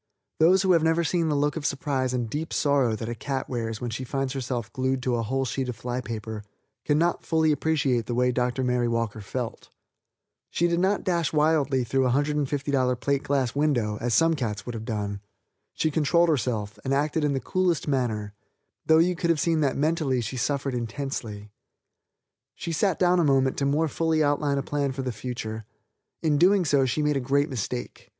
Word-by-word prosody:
Those 180 +4 +5
who 190 - +3
have 170 -2 +5
never 160 +1 +2
seen 165 0 0
the 150 - +1
look 145 +1 +1
of 160 - -4
surprise 135 -2 -1
and 125 -2 -1
deep 150 +8 -4
sorrow 140 -6 +2
that 110 +1 -5
a 120 - -3
cat 130 +4 -4
wears 115 -3 -3
when 120 -2 -4
she 120 +3 -4
finds 135 +1 -2
herself 125 -4 -4
glued 130 0 -1
to 125 - 0
a 115 - 0
whole 135 +4 -1
sheet 130 +1 -2
of 125 - -4
fly 125 +2 -4
paper 110 -2 -6 0.4
can 145 0 +2
not 170 +2 +1
fully 160 -1 +2
appreciate 140 -6 +1
the 120 - -2
way 125 +1 +2
Dr. 125 +1 -1
Mary 125 -1 +1
Walker 115 -2 -2
felt. 115 +3 -5 0.8
She 175 - +1
did 170 0 +1
not 195 +3 +1
dash 170 -4 0
wildly 150 -4 +2
through 130 +3 +1
a - - +1
$150 140 -2 0
plate 140 0 0
glass 135 -4 0
window, 120 -8 0
as 120 -1 +1
some 165 +6 +4
cats 110 -9 -3
would 120 - -5
have 110 -1 -6
done. 100 -3 -3 0.5
She 155 - 0
controlled 165 +3 +3
herself 110 -7 -1
and 135 +1 0
acted 150 +2 0
in 145 -1 +1
the 135 - 0
coolest 180 0 0
manner, 110 -7 -1 0.5
though 160 - +6
you 175 +2 +3
could 170 0 -1
have 165 -2 +3
seen 165 0 +1
that 140 -3 +1
mentally 150 -3 +1
she 120 - -4
suffered 135 +2 -1
intensely. 115 -4 -5 1.0
She 170 - -5
sat 180 +3 +1
down 180 0 +3
a - - +3
moment 135 -3 +3
to 140 - +1
more 150 +3 +2
fully 160 +1 +1
outline 145 -1 +1
a 140 - -1
plan 140 -2 -1
for 135 0 -4
the 130 - -2
future. 110 -2 -5 0.6
In 150 -3 +2
doing 185 +2 +4
so 140 -3 +3
she 150 +5 0
made 150 -1 +2
a - - +1
great 140 +3 +1
mistake. 95 - -5
135 Hz, 205 wpm, -26 LUFS, 120-155 Hz, 1.0 s, though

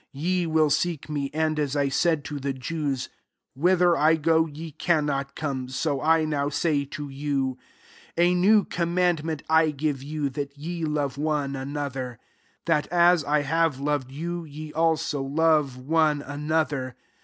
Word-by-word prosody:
Ye 175 +5 0
will 155 -2 +3
seek 155 +1 -1
me: 145 -2 -2
and, 155 0 0
as 145 -1 -1
1 140 -1 +1
said 160 0 +1
to 150 -2 -5
the 140 0 -2
Jews, 135 0 -3 0.2
< - - -58
Whither 175 +4 +3
I 155 +1 +4
go, 160 +1 +2
ye 155 +2 -8
cannot 145 -3 0
come,' 135 -4 -3
so 140 +1 -1
I 160 +1 +3
now 145 -2 -1
say 145 -1 0
to 145 +1 -6
you. 135 -2 -2 0.6
34 170 - +4
A 180 - +3
new 200 +4 +5
commandment 170 -3 0
I 160 0 +4
give 145 -2 -2
you, 145 0 -3
that 140 +1 -5
ye 165 +2 -4
love 145 -3 -2
one 145 -2 -1
another; 135 -3 -4 0.5
that, 155 -3 +1
as 175 -1 +4
I 150 0 +2
have 160 -1 +1
loved 145 -2 -1
you, 170 +4 -4
ye 155 0 -9
also 160 -3 +1
love 150 -1 +2
one 150 +2 +1
another. 145 -3 -2
150 Hz, 165 wpm, -25 LUFS, 140-160 Hz, 0.6 s, new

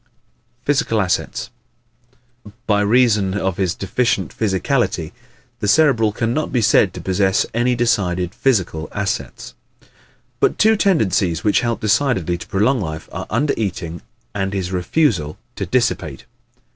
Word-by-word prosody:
Physical 140 -6 +1
Assets 95 +4 -1 1.0
¶ - - -17
By 105 -2 +2
reason 105 -3 +3
of 95 -3 -1
his 95 -2 0
deficient 100 0 -1
physicality 95 - 0 0.5
the 105 - -2
Cerebral 115 -4 +4
can 115 +2 -1
not 155 +3 -2
be 125 - +1
said 110 - +4
to - - -6
possess 95 +1 +1
any 120 +2 +1
decided 95 -7 0
physical 95 -11 0
assets. 100 -10 -4 0.9
But - - +2
two 220 +1 +4
tendencies 100 - +1
which 105 - +3
help 120 -1 -2
decidedly 100 - +1
to - - -9
prolong 110 +6 +1
life 80 -3 -6
are 95 +1 -6
under 140 +7 +1
eating 85 -5 -4 0.3
and 95 -1 -2
his 95 -2 -3
refusal 90 - 0 0.2
to - - -4
dissipate. - - -1
100 Hz, 135 wpm, -19 LUFS, 95-120 Hz, 1.0 s, Cerebral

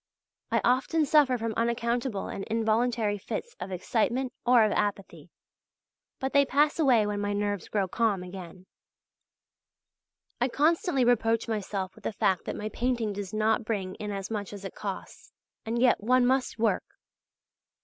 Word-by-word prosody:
I - - +1
often 265 +6 +2
suffer 280 -3 +4
from 225 -1 -3
unaccountable 235 -1 -1
and 195 - -5
involuntary 225 -1 +1
fits 470 - -5
of 190 - -6
excitement 235 +7 -1
or 245 -2 +6
of 215 - +2
apathy; 200 -1 -2 0.9
but 265 0 -3
they 280 - +6
pass 290 +4 +2
away 250 -8 +4
when 205 0 -2
my 205 0 -1
nerves 205 -1 -2
grow 200 -3 0
calm 205 -1 0
again. 180 0 -10 1.7
I 245 - +2
constantly 295 0 +2
reproach 230 -1 +2
myself 200 -3 -3
with - - -18
the - - -1
fact 190 -2 +1
that - - -4
my 215 - -4
painting 235 -3 -1
does 200 -2 -5
not 215 +1 +1
bring 200 -4 -3
in 210 +1 -6
as 195 0 -5
much 205 -2 -4
as 200 -1 -8
it 190 - -6
costs, 195 -2 -7 0.3
and 235 +1 -1
yet 245 -3 +4
one 250 +2 +4
must 260 -1 +1
work. 225 -1 0
225 Hz, 160 wpm, -28 LUFS, 205-250 Hz, 1.7 s, or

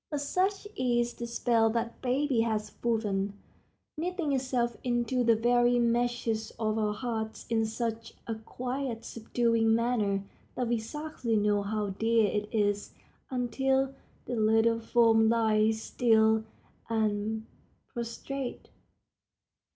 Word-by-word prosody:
But 295 -2 -2
such 380 +8 0
is 240 - +1
the 235 - -6
spell 235 -1 +2
that 230 0 -3
baby 260 -1 +1
has 215 -2 -1
woven, 205 -4 0 0.6
knitting 340 -1 -2
itself 250 -3 0
into 245 0 +1
the 230 -1 +5
very 240 +2 +3
meshes 235 -2 0
of 220 -1 0
our 210 -1 0
hearts 220 -2 -4
in 225 -1 +2
such 225 0 -4
a 230 - -2
quiet, 245 +2 -4
subduing 230 -1 +1
manner 220 -4 +1 0.3
that 245 -2 -1
we 235 -1 +1
scarcely 255 -1 -3
know 205 -1 +2
how 205 0 -2
dear 225 +3 +2
it 210 0 -2
is 205 -2 0 0.3
until 265 +2 0 0.3
the 245 - -3
little 225 +1 +3
form 225 -1 +4
lies 220 -1 +2
still 220 -2 +3 0.4
and 220 0 0 0.5
prostrate. 245 +3 -5
230 Hz, 120 wpm, -29 LUFS, 220-245 Hz, 0.6 s, the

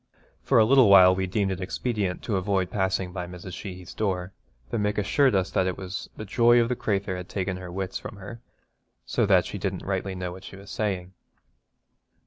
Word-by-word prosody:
For - - +2
a 110 - +7
little 130 -2 +6
while 95 -2 +8
we 95 0 -1
deemed 95 +1 0
it 95 0 -4
expedient 100 -1 -2
to 110 - -1
avoid 95 -1 0
passing 95 -2 -1
by 90 -1 -4
Mrs. 90 +1 -9
Sheehy's 90 -2 -8
door, 95 -3 -2 0.4
though 115 - -1
Mick 105 0 0
assured 105 +5 +3
us 95 -1 +1
that 95 - +1
it 90 - -2
was 95 0 -6
'the 110 - -6
joy 120 +3 +4
of 115 0 +2
the 125 - 0
crathur 100 -4 -1
had 90 -1 -7
taken 95 -1 -2
her 90 -1 -8
wits 95 +1 -4
from - - -8
her, 115 +4 -10 0.6
so - - +1
that 95 -4 +4
she 100 - -6
didn't 95 -1 -3
rightly 95 0 -2
know 90 -1 -4
what 95 +1 -10
she 95 - -10
was 100 +1 -12
saying.' 95 -4 -2
95 Hz, 210 wpm, -26 LUFS, 90-105 Hz, 0.6 s, while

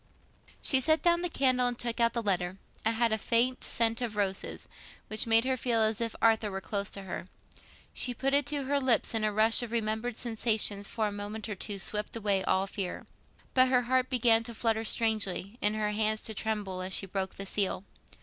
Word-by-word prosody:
She 265 - +4
set 315 +4 +2
down 345 0 +3
the 355 - -1
candle 255 -4 +3
and 245 -1 -2
took 235 -1 -2
out 230 0 +3
the 235 - -2
letter. 185 -2 -1 0.3
It 225 - +2
had 230 0 +1
a 220 - 0
faint 245 +4 +1
scent 230 +1 0
of 230 -3 -3
roses, 195 -2 -3 0.4
which 215 +2 0
made 225 +1 +4
her 260 0 +1
feel 235 -2 0
as 220 +1 0
if 230 -1 -2
Arthur 220 -2 +3
were 195 -1 -4
close 200 +1 -3
to 195 - -6
her. 185 -1 -6 0.7
She 245 - -1
put 270 +3 -1
it 285 0 +3
to 290 -1 0
her 280 +2 0
lips, 255 -3 +2
and 220 -1 0
a 215 - +1
rush 220 +3 +5
of 240 -2 -6
remembered 220 +1 -2
sensations 220 -3 +2
for 220 -2 -2
a 210 - -1
moment 205 +2 -6
or 210 - -3
two 200 +1 -3
swept 210 +3 -2
away 200 -4 0
all 190 +1 +1
fear. 195 -2 -5 0.5
But 255 0 +5
her 250 -1 +2
heart 255 +1 +1
began 235 -3 +4
to 235 - -4
flutter 225 0 0
strangely, 215 -1 0
and 210 +1 +2
her 210 -1 -1
hands 215 0 0
to 220 - -3
tremble 205 -4 -3
as 185 +1 -4
she 195 - -1
broke 190 0 -4
the 195 - -6
seal. 195 -1 -1
220 Hz, 215 wpm, -29 LUFS, 205-240 Hz, 0.7 s, rush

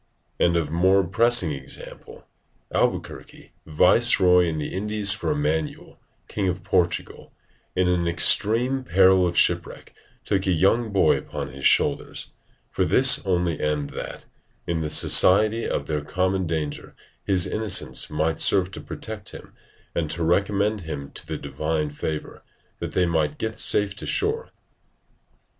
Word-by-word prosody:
[Diogenes 85 0 +2
Laertius] - - +3
And 80 -3 -1
of 85 - -2
more 95 +1 +4
pressing 115 -1 +3
example, 70 - -8 0.5
Albuquerque, - - -3 0.2
viceroy 90 +3 +4
in 80 -2 -3
the 75 - -5
Indies 105 +1 +1
for 110 +8 -2
Emmanuel, 80 - -3 0.3
king 100 -3 -3
of 90 0 -3
Portugal, 90 -2 -1 0.4
in 90 0 +1
an 90 -1 0
extreme 115 +10 +2
peril 95 -2 +4
of 85 -1 -4
shipwreck, - - 0 0.3
took 95 -1 -1
a - - +2
young 105 +7 +1
boy 100 - +3
upon - - -7
his 70 +1 0
shoulders, - - 0 0.4
for - - 0
this 130 -1 +5
only 90 -3 0
end 75 -1 -2
that, - - -8 0.4
in 85 -1 -2
the 75 - -3
society 110 +8 +3
of - - -3
their 75 -1 -3
common 95 +3 -1
danger 80 -3 -5 0.3
his 95 -3 +2
innocence 110 -2 -1
might 80 +1 -1
serve 95 -2 +2
to - - -9
protect 105 -3 -8
him, - - -12 0.4
and 80 -3 -2
to 85 - -3
recommend 100 +4 0
him 70 -4 -7
to - - -9
the - - -4
divine 75 -1 -3
favour, 75 +1 -6 0.4
that - - -6
they 90 - +2
might 80 -3 -1
get 110 0 -5
safe 100 -1 +2
to - - -7
shore. 445 +3 -1
90 Hz, 150 wpm, -23 LUFS, 80-105 Hz, 0.5 s, this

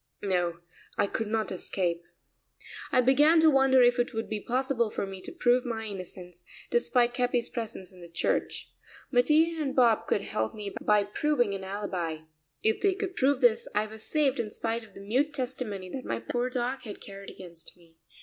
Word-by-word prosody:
No, 175 -3 0 0.4
I - - +3
could 220 +2 -3
not 220 0 -1
escape. 175 -2 -2 0.9
I 255 - +5
began 295 +6 +5
to 320 -1 +6
wonder 270 -2 +5
if 245 0 +4
it 245 -1 0
would 225 - -2
be 215 - -2
possible 250 -2 0
for 200 - -3
me 195 -1 -8
to - - -8
prove 250 -7 +3
my 225 -3 -3
innocence, 180 -3 -8 0.3
despite 245 - +2
Capi's 245 -1 0
presence 215 -5 -6
in 180 -1 -16
the 170 - -11
church. 170 - -1 0.4
Mattia 310 +6 +4
and 275 -3 -2
Bob 235 -4 +4
could 200 - +1
help 110 0 -2
me 205 -2 -6
by 210 -1 +4
proving 245 +1 0
an 195 -1 -5
alibi. 185 -5 -3 0.4
If 220 0 +2
they 395 -2 +3
could 390 -2 -4
prove 270 0 +2
this 240 -3 +4
I 210 +1 +2
was 215 0 -9
saved 285 +1 +1
in 225 -2 -1
spite 230 +2 -2
of 210 -3 -17
the - - -10
mute 265 +9 0
testimony 245 -8 -2
that 260 - -5
my 115 - -2
poor 240 - -2
dog 250 +1 -2
had 210 -3 -8
carried 195 0 -10
against 170 -2 -11
me. 165 -2 -23
225 Hz, 190 wpm, -28 LUFS, 195-255 Hz, 0.9 s, to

